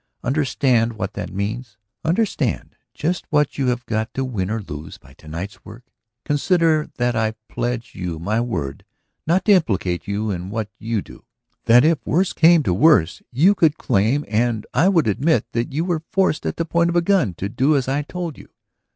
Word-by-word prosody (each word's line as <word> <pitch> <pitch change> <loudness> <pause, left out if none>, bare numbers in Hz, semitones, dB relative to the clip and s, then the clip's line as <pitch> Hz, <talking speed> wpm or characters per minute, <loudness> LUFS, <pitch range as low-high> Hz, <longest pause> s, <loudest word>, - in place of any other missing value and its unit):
Understand 130 -4 +1
what 110 - -4
that - - -5
means. 105 +2 -4 0.3
Understand 165 - -1 0.2
just 175 +4 -2
what 150 -2 +1
you 135 - +1
have 125 -1 -1
got 110 0 -2
to 135 - -1
win 100 -7 -3
or 115 +1 -1
lose 75 -3 -8
by 65 - -19
to 80 - -18
night's 85 +6 -7
work. 115 +4 -12 0.4
Consider 155 +1 +2
that 120 -1 0
I 110 -1 0
pledge 120 -1 -3
you 90 -3 -4
my 105 +8 -1
word 70 - -4 0.4
not 175 +4 +2
to 215 - +4
implicate 95 - +1
you 105 +1 -1
in 90 0 -5
what 110 0 -4
you 110 -2 -2
do; - - -15 0.4
that 120 +4 +6
if 160 -1 +2
worse 185 +4 +1
came 165 -1 +5
to 95 - +1
worse, 95 - +4
you 165 +11 +4
could 160 -6 +2
claim 115 +9 +1
and 110 +1 0
I 180 +5 +4
would 170 -6 +3
admit 125 - +2
that 115 +3 -2
you 155 +5 -1
were 175 -4 -1
forced 190 -5 +1
at - - -3
the 165 - -1
point 170 +1 +1
of 170 - -2
a 175 - +3
gun 170 - +2
to 95 - -3
do 135 +8 +2
as 130 - -1
I 140 +2 0
told 170 +1 -6
you. - - -14
125 Hz, 195 wpm, -21 LUFS, 105-160 Hz, 0.4 s, that